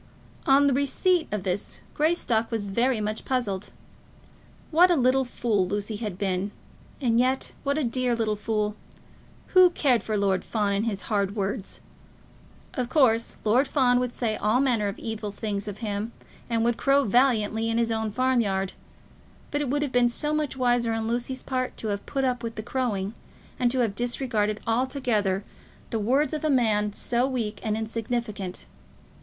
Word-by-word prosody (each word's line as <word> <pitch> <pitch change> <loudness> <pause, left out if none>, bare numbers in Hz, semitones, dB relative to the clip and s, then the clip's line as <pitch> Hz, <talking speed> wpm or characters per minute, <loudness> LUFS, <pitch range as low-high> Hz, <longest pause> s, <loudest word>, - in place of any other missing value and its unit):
On 280 +1 +6
receipt 315 +6 +2
of 210 -3 -2
this, 185 +2 -3
Greystock 295 -8 +1
was 225 -3 -1
very 235 +4 +1
much 215 +1 -3
puzzled. 210 -7 -2 1.0
What 350 +3 +6
a 350 - +4
little 260 -1 +3
fool 220 -6 0
Lucy 205 +2 -3
had 210 -5 -4
been, 190 0 -1 0.5
and 235 -4 +2
yet 260 +2 +1
what 280 +1 0
a 310 - +1
dear 250 0 +1
little 220 -2 0
fool! 210 0 -1 0.7
Who 370 -1 +7
cared 270 -8 +2
for 215 -1 -2
Lord 195 -2 +1
Fawn 205 -3 0
and 200 +2 0
his 200 -3 -3
hard 200 -2 0
words? 200 0 -3 0.9
Of 250 -4 -2
course, 235 -6 +3
Lord 245 +6 +3
Fawn 250 -3 +3
would 250 -1 -1
say 230 -3 -1
all 215 +4 +2
manner 240 -6 +2
of 200 - -4
evil 220 -2 -4
things 205 -1 -3
of 210 +3 -5
him, 210 +2 -3 0.4
and 230 -1 +1
would 235 0 +1
crow 280 0 +3
valiantly 225 -2 +2
in 225 - 0
his 230 -1 +1
own 220 -1 -1
farm 255 +3 +2
yard; 195 -3 -1 0.8
but 290 - 0
it 285 - -2
would 290 +2 +1
have 285 - -2
been 245 -1 +4
so 295 +5 -2
much 300 -3 -1
wiser 245 -2 +2
on 225 0 -2
Lucy's 245 +3 -2
part 255 -1 -2
to 220 - -4
have 200 0 -2
put 275 -2 -1
up 250 -2 0
with 230 -2 -5
the 215 - -5
crowing, 220 -5 -2 0.5
and 245 -1 +3
to 255 +1 0
have 225 -4 +1
disregarded 230 -3 -1
altogether 230 -5 0 0.5
the 225 - 0
words 265 +9 +2
of 305 - -3
a 310 - +1
man 215 -6 +2
so 240 +4 0
weak 230 -6 -3
and 215 -1 -1
insignificant! 220 -3 -3
230 Hz, 175 wpm, -26 LUFS, 210-255 Hz, 1.0 s, Who